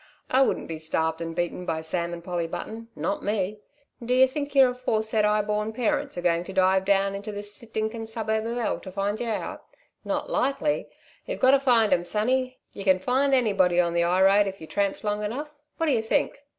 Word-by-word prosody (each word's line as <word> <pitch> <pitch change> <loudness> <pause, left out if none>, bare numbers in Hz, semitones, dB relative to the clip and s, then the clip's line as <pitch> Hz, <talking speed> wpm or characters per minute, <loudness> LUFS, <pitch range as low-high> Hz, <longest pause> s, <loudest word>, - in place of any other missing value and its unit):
I 260 - +4
wouldn't 270 - +1
be 160 -1 -5
starved 160 +1 -1
and 165 0 -4
beaten 175 +1 -2
by 160 -2 -2
Sam 170 +2 -2
and 170 -1 -7
Polly 175 -2 -2
Button. 225 +6 -6
Not 300 0 -2
me. 205 0 -1 0.4
D'ye 250 +2 +5
think 285 +2 -5
yer 265 -2 +7
aforesaid 220 -3 0
'igh 210 0 +2
born 210 +1 -1
parents 225 -5 -1
are 175 - -4
going 170 -1 +2
to 195 - -8
dive 190 0 +3
down 195 0 +2
into 200 +2 -5
this 205 0 -5
stinkin' 225 0 -4
suburb 220 0 -2
of 235 +1 -3
hell 240 - -1
to 185 - -9
find 200 +2 -2
yer 240 - -2
out? 215 - -4 0.4
Not - - -2
likely. 275 +3 0 0.4
You've - - -4
got 260 - +5
to 275 - +5
find 235 -5 +4
'em 175 - +1
sonny. 255 +6 0 0.2
Yer 200 - -7
can 190 -1 +4
find 265 +8 +2
anybody 195 -8 +3
on 170 -1 +2
the 170 - +2
'ighroad 190 +4 +4
if 195 0 -5
yer 160 - -8
tramps 200 +4 -1
long 210 0 -1
enough. 285 +8 -4 0.2
What 330 - 0
d'yer 265 -8 +2
think?" 220 +5 0
210 Hz, 210 wpm, -26 LUFS, 185-240 Hz, 0.4 s, yer